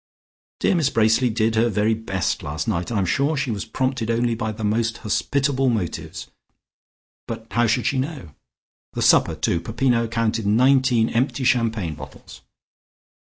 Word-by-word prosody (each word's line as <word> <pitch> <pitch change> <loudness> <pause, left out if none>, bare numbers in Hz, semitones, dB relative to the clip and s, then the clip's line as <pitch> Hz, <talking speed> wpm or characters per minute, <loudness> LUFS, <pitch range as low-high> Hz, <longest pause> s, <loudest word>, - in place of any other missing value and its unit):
Dear - - +3
Miss 160 -6 +2
Bracely 115 +3 +2
did 110 0 0
her 115 +1 +2
very 105 +1 +1
best 100 -5 -2
last 75 +6 -4
night; 90 -1 -2
I 115 - -1
am 95 - +1
sure 140 - 0
she 135 -3 -1
was 100 -3 -4
prompted 130 -3 -2
only 120 +1 +1
by 110 -1 -3
the 110 +1 -7
most 110 +1 0
hospitable 135 +4 0
motives, 105 -8 -4 1.0
but 115 -1 -6
how 120 +3 +2
should 120 +2 0
she 135 - +1
know? 130 - -5 0.6
The - - -2
supper - - +4
too. 85 - 0
Peppino 115 +4 0
counted 115 -1 -1
nineteen 125 +1 +3
empty 130 +3 -1
champagne 115 -9 +1
bottles." - - -12
115 Hz, 160 wpm, -22 LUFS, 110-130 Hz, 1.0 s, supper